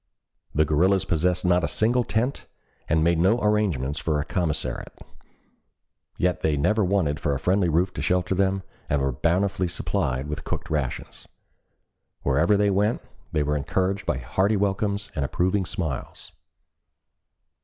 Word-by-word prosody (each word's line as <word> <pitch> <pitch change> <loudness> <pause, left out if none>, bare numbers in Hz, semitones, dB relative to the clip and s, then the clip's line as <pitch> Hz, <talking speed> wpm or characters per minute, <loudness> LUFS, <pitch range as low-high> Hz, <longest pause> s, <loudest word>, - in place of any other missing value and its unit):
The 75 +1 +4
guerrillas 90 +6 +2
possessed 90 +2 0
not 90 0 +3
a - - +2
single 120 +3 +1
tent, 120 +4 -2 0.4
and 80 0 +3
made 85 0 +2
no 100 +8 +3
arrangements 95 - 0
for 75 -2 0
a 75 - -2
commissariat, 90 -7 -2 1.2
yet 90 -1 0
they 75 -2 +1
never 105 +10 +2
wanted 90 -6 +1
for 70 -2 0
a - - -3
friendly 90 +4 +2
roof 85 +4 +1
to - - -5
shelter 90 +1 +1
them 95 0 +1 0.3
and 70 - +2
were 70 0 0
bountifully 90 +6 0
supplied 65 -5 -1
with 75 0 -5
cooked - - -5
rations. 75 -5 -3 1.0
Wherever 80 +9 +3
they 100 0 +3
went 105 +4 +1 0.3
they 75 -2 +1
were 75 +1 0
encouraged 95 +7 -1
by - - +1
hearty 95 - +1
welcomes 100 +1 -1
and 75 - -1
approving 90 +6 0
smiles. 80 -8 -4
90 Hz, 150 wpm, -25 LUFS, 75-100 Hz, 1.2 s, The